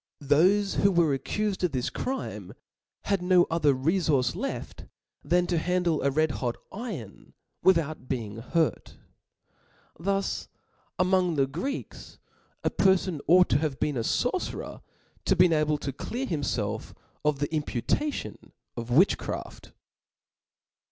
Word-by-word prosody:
Thofe 185 +8 +3
who 200 - +4
were 170 -5 +3
accuied 210 +8 -2
of 180 - +1
this 125 -2 -1
crime, 265 +1 -4 0.5
had 200 -2 0
no 180 -1 +5
other 150 -4 +3
refource 150 -2 +1
left - - -5 0.4
than 180 0 +2
to 175 -2 0
handle 175 -2 +1
a 140 - +2
red 155 +2 +1
hot 120 -3 -2 0.2
iron 195 - -8 0.3
without 160 -7 +2
being 115 -5 -3
hurt. 155 +8 -1 1.0
Thus 195 +3 -1 0.5
among 180 -2 +2
the 135 -2 +3
Greeks 175 - -6 0.5
a - - +1
perfon 190 -4 +2
ought 180 +3 +6
to - - +3
have 150 -3 -2
been 150 - 0
a 120 - 0
forcerer 250 - -2 0.4
to 190 - +3
be 180 -2 +5
able 155 -1 +2
to 140 -2 -5
clear 245 - -4
himfelf 110 - -2 0.3
of 150 -1 +2
the 145 +1 -1
impu 150 -6 -3
tation 300 -1 -2 0.2
of 120 0 -6
witchcraft. 160 +11 0
165 Hz, 130 wpm, -27 LUFS, 140-185 Hz, 1.0 s, ought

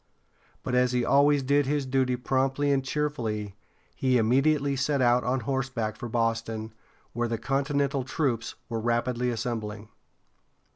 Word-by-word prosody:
But 125 - -3
as 125 0 +3
he 125 -1 +1
always 140 0 +4
did 140 +1 +2
his 145 -1 0
duty 130 -1 +1
promptly 135 +3 0
and 135 -1 +2
cheerfully, 120 -8 -2 0.4
he 130 -1 +2
immediately 140 +5 +2
set 140 +2 0
out 125 0 +3
on 125 +1 0
horseback 125 -3 -2
for 120 - -7
Boston, 115 -1 -1 0.4
where 120 0 -1
the 115 0 -2
continental 135 +2 0
troops 125 -4 -2
were 115 -1 -3
rapidly 120 +2 0
assembling. 110 -2 -4
125 Hz, 140 wpm, -27 LUFS, 115-135 Hz, 0.4 s, always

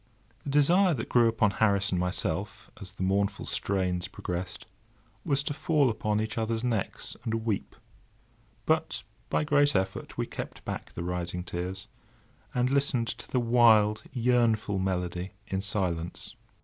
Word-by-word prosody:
The - - -6
desire 170 +5 +4
that 110 - -5
grew 120 -1 +5
upon 110 -2 +2
Harris 100 -2 +2
and 90 - +1
myself, 90 +2 -2
as 95 -2 -8
the 95 - -4
mournful 100 +1 0
strains 90 -2 -1
progressed, 90 0 -5 0.6
was 140 -4 +1
to 145 - -2
fall 150 -3 +2
upon 105 -1 0
each 110 +1 -2
other's 115 +1 -1
necks 115 -5 -2
and 115 0 -2
weep; 105 -4 -2 0.9
but - - +1 0.3
by - - +1
great 145 -1 +3
effort 95 0 -2
we - - 0
kept - - -7
back - - -5
the 85 - -4
rising 90 0 -3
tears, 90 +2 -4 0.7
and 125 -1 +1
listened 135 -4 +1
to 120 - -6
the 130 - +1
wild 115 -3 +5
yearnful 115 -5 +2
melody 90 -1 -2
in 95 0 -2
silence. 90 -4 -3
105 Hz, 150 wpm, -29 LUFS, 95-120 Hz, 0.9 s, grew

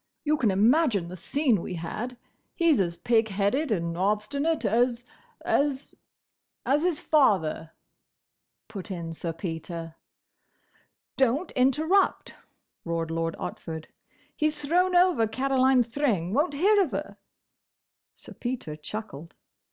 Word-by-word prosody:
You 305 0 +2
can 250 -8 +1
imagine 210 - +3
the 180 - -7
scene 245 - +1
we 180 - -5
had. 215 +9 -5 0.4
He's 335 - +3
as 170 -3 -1
pig 225 +5 +2
headed 210 +8 0
and 170 -4 -1
obstinate 215 - 0
as—as—" 255 - -1 0.7
"As 285 +3 +2
his 345 -3 0
father," 185 - +2 1.0
put 205 -3 -8
in 170 -3 -5
Sir 165 +1 -4
Peter. 165 -1 -6 1.2
"Don't 270 +6 +1
interrupt!" 310 +10 +2 0.5
roared 165 -1 -2
Lord 165 0 -2
Otford. 160 -1 -6 0.5
"He's 305 0 0
thrown 360 +5 +1
over 350 -10 +4
Caroline 260 +2 +3
Thring—won't 240 - 0
hear 405 +7 +4
of 360 - +1
her." - - -5 1.0
Sir - - -12
Peter 240 -11 -4
chuckled. 165 -1 -8
235 Hz, 115 wpm, -27 LUFS, 175-295 Hz, 1.2 s, over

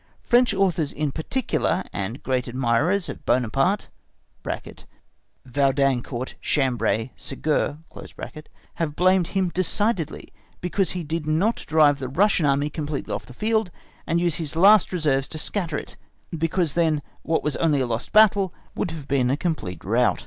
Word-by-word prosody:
French 240 +1 +4
authors 175 -6 +1
in 150 -1 -2
particular, 185 - -1
and 105 +6 -4
great 130 -1 -1
admirers 130 +10 +1
of - - -7
Buonaparte 135 - +1 1.6
(Vaudancourt, 135 -1 0
Chambray, 120 -4 0
Ségur), 150 +1 -1 1.0
have 160 -4 -3
blamed 185 0 +3
him 190 -2 0
decidedly 185 -1 -1 0.3
because 180 +2 -1
he 175 - -3
did 160 0 -3
not 180 +9 +2
drive 150 -2 +4
the 130 -2 -4
Russian 175 +1 +3
Army 140 +2 +1
completely 150 -2 -4
off - - -5
the 125 - -12
field, 220 - +1 0.4
and 170 - +2
use 170 -2 +1
his 160 -3 -5
last 195 +4 +6
reserves 145 -7 +1
to 155 - -5
scatter 165 -1 -2
it, - - -8 0.4
because 165 -1 0
then 160 -4 +1 0.2
what 160 +1 0
was 150 - -1
only 150 -4 +2
a 130 - +1
lost 120 0 -3
battle 205 -3 +5 0.2
would - - -2
have 155 -4 -7
been 130 -3 +2
a 135 - +1
complete 145 - -3
rout. 120 +5 +2
155 Hz, 150 wpm, -24 LUFS, 135-180 Hz, 1.6 s, last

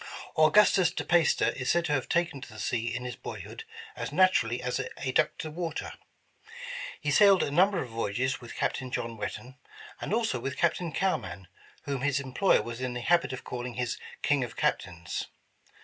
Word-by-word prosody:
Augustus 175 +3 +5
DePeyster 170 -3 +2
is 130 -1 -3
said 175 0 +3
to - - -1
have 135 -3 0
taken 170 -5 0
to - - -10
the 110 - -11
sea 115 +1 -1
in 125 +2 -4
his 125 - -4
boyhood 450 - -8 0.3
as - - -4
naturally 125 -11 +3
*'as 125 0 -2 0.2
a 130 - -2
duck 155 +4 +2
to 155 - -5
wa 170 +1 -3
ter." - - -5 1.1
He - - -1
sailed 200 -3 +6
a - - -2
number 185 +4 +3
of 125 - -10
voyages 120 +5 -1
with 120 - -9
Captain 130 - -1
John 115 -2 -3
Whetten, 130 +4 -6 0.4
and - - -4
also 220 - +1
with 135 +3 -4
Captain 170 0 +1
Cowman, 95 - -2 0.4
whom 140 -4 -3
his 145 0 +1
employer 135 +8 +2
was 120 +1 -6
in 125 -1 -2
the 120 - -3
habit 170 +4 +3
of 130 - -6
calling 125 -1 -5
his 125 -2 -2 0.2
''King 145 -2 +3
of 120 -2 -7
Captains." 85 -2 -2
135 Hz, 185 wpm, -29 LUFS, 120-170 Hz, 1.1 s, sailed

